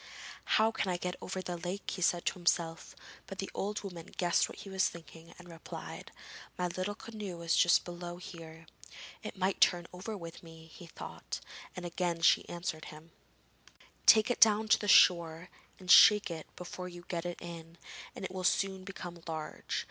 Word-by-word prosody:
'How 220 Hz, +1 st, +4 dB
can 200 Hz, -, -2 dB
I 180 Hz, -, 0 dB
get 180 Hz, 0 st, -3 dB
over 185 Hz, 0 st, -4 dB
the 175 Hz, -1 st, -4 dB
lake?' 180 Hz, +4 st, -4 dB
he 185 Hz, -, -5 dB
said 175 Hz, 0 st, +2 dB
to -, -, +1 dB
himself, 170 Hz, -2 st, -1 dB, 0.3 s
but 195 Hz, -, -8 dB
the 195 Hz, -, -4 dB
old 210 Hz, +2 st, -3 dB
woman 175 Hz, -4 st, -8 dB
guessed 175 Hz, -1 st, +2 dB
what -, -, -10 dB
he 200 Hz, -, -9 dB
was 190 Hz, -1 st, +2 dB
thinking 165 Hz, 0 st, -13 dB
and 180 Hz, -, -13 dB
replied: 165 Hz, -1 st, -9 dB, 0.5 s
'My 180 Hz, 0 st, 0 dB
little 185 Hz, +4 st, -3 dB
canoe 210 Hz, -6 st, -7 dB
is 165 Hz, -, +2 dB
just 175 Hz, -, +5 dB
below 175 Hz, 0 st, -7 dB
here.' 165 Hz, -2 st, -10 dB, 0.6 s
'It -, -, -7 dB
might 190 Hz, +1 st, 0 dB
turn 175 Hz, -1 st, +4 dB
over 200 Hz, +4 st, -6 dB
with 170 Hz, -2 st, -9 dB
me,' 165 Hz, -1 st, -13 dB
he 175 Hz, -, -11 dB
thought, -, -, -7 dB, 0.4 s
and 180 Hz, -1 st, -6 dB
again 175 Hz, -1 st, -1 dB
she 170 Hz, -, +4 dB
answered 170 Hz, -2 st, -4 dB
him: 155 Hz, +2 st, -12 dB, 1.0 s
'Take 220 Hz, +2 st, +7 dB
it -, -, -2 dB
down 220 Hz, 0 st, +6 dB
to -, -, +6 dB
the 205 Hz, -, -4 dB
shore 170 Hz, -2 st, +5 dB, 0.3 s
and 180 Hz, -1 st, -1 dB
shake 210 Hz, -4 st, +8 dB
it 160 Hz, -2 st, -6 dB
before 180 Hz, +1 st, -7 dB
you 175 Hz, 0 st, -11 dB
get 170 Hz, -2 st, -3 dB
in, 170 Hz, -1 st, -7 dB, 0.4 s
and -, -, -5 dB
it -, -, -5 dB
will 185 Hz, 0 st, -5 dB
soon 190 Hz, +1 st, +1 dB
become 175 Hz, -3 st, -8 dB
large. 155 Hz, -2 st, -4 dB
175 Hz, 185 wpm, -32 LUFS, 170-190 Hz, 1.0 s, shake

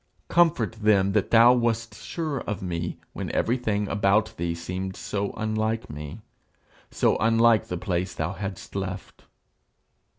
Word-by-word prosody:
Comfort 165 Hz, -10 st, +3 dB
them 100 Hz, -2 st, +4 dB
that 105 Hz, -1 st, +1 dB
thou 115 Hz, +2 st, +7 dB
wast 115 Hz, -2 st, 0 dB
sure 155 Hz, +6 st, -4 dB
of 105 Hz, -2 st, -4 dB
me 85 Hz, -1 st, -3 dB, 0.2 s
when -, -, -4 dB
everything 110 Hz, -4 st, 0 dB
about 100 Hz, +1 st, +2 dB
thee 85 Hz, 0 st, -2 dB
seemed 95 Hz, +3 st, -5 dB
so 100 Hz, -1 st, -3 dB
unlike 110 Hz, 0 st, -2 dB
me, 75 Hz, +7 st, -8 dB, 0.7 s
so -, -, +2 dB
unlike 115 Hz, 0 st, +4 dB
the 90 Hz, -, -3 dB
place 90 Hz, 0 st, -2 dB
thou 80 Hz, +4 st, -2 dB
hadst 95 Hz, +1 st, -7 dB
left."' 95 Hz, -1 st, -6 dB
105 Hz, 135 wpm, -26 LUFS, 95-115 Hz, 0.7 s, thou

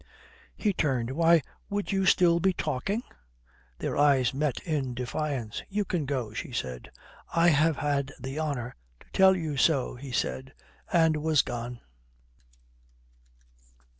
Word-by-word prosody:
He 210 Hz, -2 st, 0 dB
turned. 130 Hz, -8 st, 0 dB
"Why, 165 Hz, +1 st, +4 dB, 0.3 s
would 205 Hz, 0 st, -2 dB
you 195 Hz, -1 st, +1 dB
still 170 Hz, -2 st, +5 dB
be 190 Hz, +2 st, +2 dB
talking?" 195 Hz, -, -2 dB, 0.7 s
Their -, -, -3 dB
eyes 135 Hz, -4 st, +3 dB
met 140 Hz, -1 st, -1 dB
in 140 Hz, -7 st, -2 dB
defiance. 125 Hz, -2 st, -3 dB
"You 205 Hz, +1 st, -1 dB
can 165 Hz, -7 st, -2 dB
go," 125 Hz, -6 st, -2 dB
she 145 Hz, +6 st, -5 dB
said. 65 Hz, -, -5 dB, 0.5 s
"I 170 Hz, +1 st, +5 dB
have 155 Hz, 0 st, +3 dB
had 140 Hz, -1 st, -1 dB
the 135 Hz, +3 st, -5 dB
honour 140 Hz, -6 st, -3 dB, 0.3 s
to -, -, -18 dB
tell 190 Hz, 0 st, +6 dB
you 155 Hz, -5 st, -3 dB
so," 135 Hz, -1 st, +2 dB
he 130 Hz, +2 st, -9 dB
said, 130 Hz, +2 st, -2 dB, 0.4 s
and 160 Hz, -3 st, +4 dB
was 155 Hz, -1 st, +3 dB
gone. 120 Hz, 0 st, -5 dB
145 Hz, 135 wpm, -28 LUFS, 125-170 Hz, 0.7 s, tell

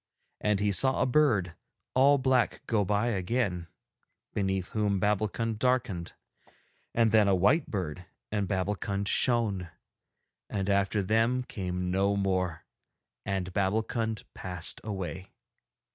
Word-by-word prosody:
And 105 Hz, -2 st, +1 dB
he 105 Hz, 0 st, +1 dB
saw 130 Hz, +7 st, +3 dB
a -, -, +3 dB
bird 120 Hz, -, +2 dB, 0.4 s
all 140 Hz, +2 st, +5 dB
black 130 Hz, -2 st, +1 dB
go 110 Hz, -3 st, +1 dB
by 105 Hz, +4 st, +1 dB
again, 95 Hz, -3 st, -1 dB, 0.7 s
beneath 95 Hz, -2 st, -1 dB
whom 105 Hz, -3 st, 0 dB
Babbulkund 105 Hz, +2 st, 0 dB
darkened, 115 Hz, -9 st, 0 dB, 0.8 s
and 115 Hz, -2 st, +3 dB
then 110 Hz, -2 st, +5 dB
a 100 Hz, -, +4 dB
white 130 Hz, -, +3 dB
bird 90 Hz, -3 st, -4 dB, 0.2 s
and 105 Hz, -2 st, 0 dB
Babbulkund 100 Hz, +1 st, -2 dB
shone; 105 Hz, -7 st, +1 dB, 0.8 s
and 100 Hz, 0 st, -1 dB
after 100 Hz, +1 st, +1 dB
them 115 Hz, +5 st, +2 dB
came 90 Hz, -5 st, -3 dB
no 100 Hz, +2 st, +2 dB
more, 95 Hz, -4 st, -1 dB, 0.6 s
and 95 Hz, -2 st, -2 dB
Babbulkund 110 Hz, +3 st, -1 dB
passed 90 Hz, -2 st, -4 dB
away. 95 Hz, -2 st, -5 dB
100 Hz, 120 wpm, -29 LUFS, 95-115 Hz, 0.8 s, all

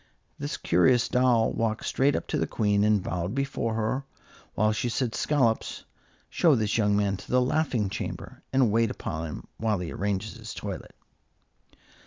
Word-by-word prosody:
This -, -, -3 dB
curious 120 Hz, +8 st, +3 dB
doll 125 Hz, -3 st, +3 dB
walked 110 Hz, -1 st, -1 dB
straight 140 Hz, +2 st, +2 dB
up -, -, -2 dB
to -, -, 0 dB
the -, -, 0 dB
Queen 105 Hz, -2 st, +1 dB
and 105 Hz, -2 st, +3 dB
bowed 90 Hz, +5 st, -3 dB
before 135 Hz, -5 st, -1 dB
her, 115 Hz, +5 st, -1 dB, 0.5 s
while 110 Hz, +1 st, +3 dB
she 115 Hz, +3 st, -1 dB
said, 120 Hz, -1 st, -1 dB
"Scollops, 130 Hz, -7 st, 0 dB, 0.4 s
show 160 Hz, -5 st, +3 dB
this 110 Hz, -2 st, 0 dB
young 105 Hz, -2 st, +3 dB
man 100 Hz, -1 st, +1 dB
to 100 Hz, -, -13 dB
the 125 Hz, -, +4 dB
laughing 125 Hz, -4 st, +1 dB
chamber, 95 Hz, -, -6 dB
and 130 Hz, -5 st, +3 dB
wait 115 Hz, +1 st, +3 dB
upon 80 Hz, -3 st, -4 dB
him 75 Hz, -, -8 dB
while 110 Hz, -2 st, 0 dB
he 90 Hz, -2 st, -5 dB
arranges 100 Hz, +2 st, -2 dB
his 110 Hz, -1 st, -9 dB
toilet." 100 Hz, -2 st, -6 dB
110 Hz, 170 wpm, -27 LUFS, 100-125 Hz, 0.5 s, the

